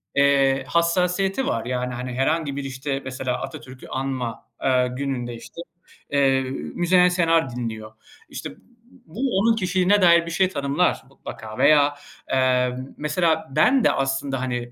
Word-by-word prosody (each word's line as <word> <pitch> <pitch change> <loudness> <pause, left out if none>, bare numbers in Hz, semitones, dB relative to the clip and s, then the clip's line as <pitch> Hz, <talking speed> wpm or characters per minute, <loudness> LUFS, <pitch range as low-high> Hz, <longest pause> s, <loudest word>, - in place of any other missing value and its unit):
eee, 140 -1 +3
hassasiyeti 180 - +1
var, 115 - -1
yani, 125 0 -2
hani, 125 +1 -5
herhangi 140 +2 0
bir, 140 - -4
işte, 135 +1 -4
mesela, 130 -1 -3
Atatürk'ü 130 0 -9
anma, 130 -3 -4
eee, 125 -1 +3
gününde, 125 -4 -3
işte, 170 +8 -10 0.5
eee, 135 -2 +3 0.3
Müzeyyen 180 +1 +4
Senar 165 -5 +2
dinliyor. 110 -3 -5 0.4
İşte, - - -6
b - - -15 0.5
bu 170 +7 -11 0.2
onun 225 +2 +3
kişiliğine 185 0 +2
dair 170 -1 +5
bir 170 - -6
şey 185 +2 +2
tanımlar 140 +2 0
mutlaka 110 -5 -9
veya, 145 -1 +4 0.4
eee, 125 -1 +2 0.2
mesela, 160 +1 0
ben 250 - +4
de - - +4
aslında, 135 -1 -1
hani, 120 -2 -3
140 Hz, 145 wpm, -23 LUFS, 130-170 Hz, 0.5 s, dair